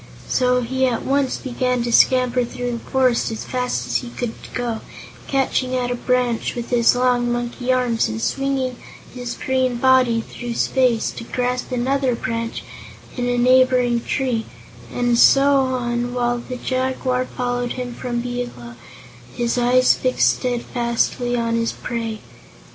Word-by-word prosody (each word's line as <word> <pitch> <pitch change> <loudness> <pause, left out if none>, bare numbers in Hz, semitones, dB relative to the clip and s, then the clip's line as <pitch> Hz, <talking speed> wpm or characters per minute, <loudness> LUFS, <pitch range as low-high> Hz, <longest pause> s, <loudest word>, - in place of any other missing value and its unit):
So 250 -1 +2
he 260 +2 0
at 235 -3 -2
once 275 -1 +1
began 250 -1 -1
to 240 - -2
scamper 250 0 +4
through 245 +1 -4
the 235 - -3
forest 255 -1 +1
as 220 -1 -5
fast 250 -1 -2
as - - 0
he 245 - -6
could 240 -1 -4 0.2
go, 240 -3 -2 0.5
catching 260 -1 0
at 245 -1 -1
a - - 0
branch 245 -1 0
with 240 0 -5
his 240 0 +4
long 245 -1 +2
monkey 240 +1 -2
arms 245 -3 +1
and 110 +1 -4
swinging 260 - -1 0.4
his 245 -2 -5
green 260 -1 0
body 255 -2 +3
through 240 +1 -7
space 250 -4 +1
to - - -8
grasp 250 +2 -2
another 255 +1 +1
branch 230 0 -4 0.5
in 245 -1 -1
a 245 - 0
neighboring 250 -1 +4
tree, 250 -5 -1 0.4
and 245 -1 +1
so 280 +1 +6
on, 245 -1 -2
while 240 0 0
the 250 +1 -7
Jaguar 255 0 -1
followed 245 -1 -2
him 250 -1 -5
from 240 -1 -3
below, 245 - -5 0.6
his 240 -1 0
eyes 250 +1 +4
fixed 255 -1 +2
steadfastly 245 0 -1
on 230 -1 -1
his 230 0 -1
prey. 230 -2 -4
245 Hz, 150 wpm, -21 LUFS, 240-255 Hz, 0.6 s, so